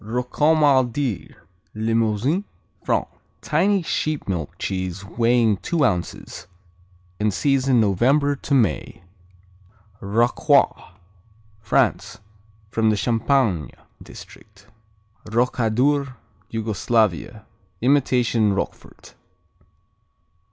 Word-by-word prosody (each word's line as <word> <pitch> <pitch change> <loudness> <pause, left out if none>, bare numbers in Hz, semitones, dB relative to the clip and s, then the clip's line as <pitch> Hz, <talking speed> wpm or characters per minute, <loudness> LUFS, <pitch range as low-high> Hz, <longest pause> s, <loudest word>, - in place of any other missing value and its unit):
Rocamadur 130 - +1 0.4
Limousin, 115 - 0 0.4
France - - 0 0.4
Tiny 200 -2 +1
sheep 155 -2 -2
milk 85 -6 -4
cheese 95 0 -4
weighing 115 0 +2
two 160 - 0
ounces. 90 -6 -3 0.7
In 105 0 +1
season 135 +2 +1
November 130 +8 +2
to 140 0 -2
May. 110 -7 0 1.0
Rocroi 120 - +1 0.7
France 110 0 0 0.5
From 110 0 +1
the 105 - +1
Champagne 115 - +1 0.3
district. 100 -2 -14 0.6
Rokadur 125 +4 +1 0.3
Yugoslavia 110 -2 -1 0.4
Imitation 125 -5 +2
Roquefort. 95 - -6
115 Hz, 75 wpm, -22 LUFS, 105-135 Hz, 1.0 s, weighing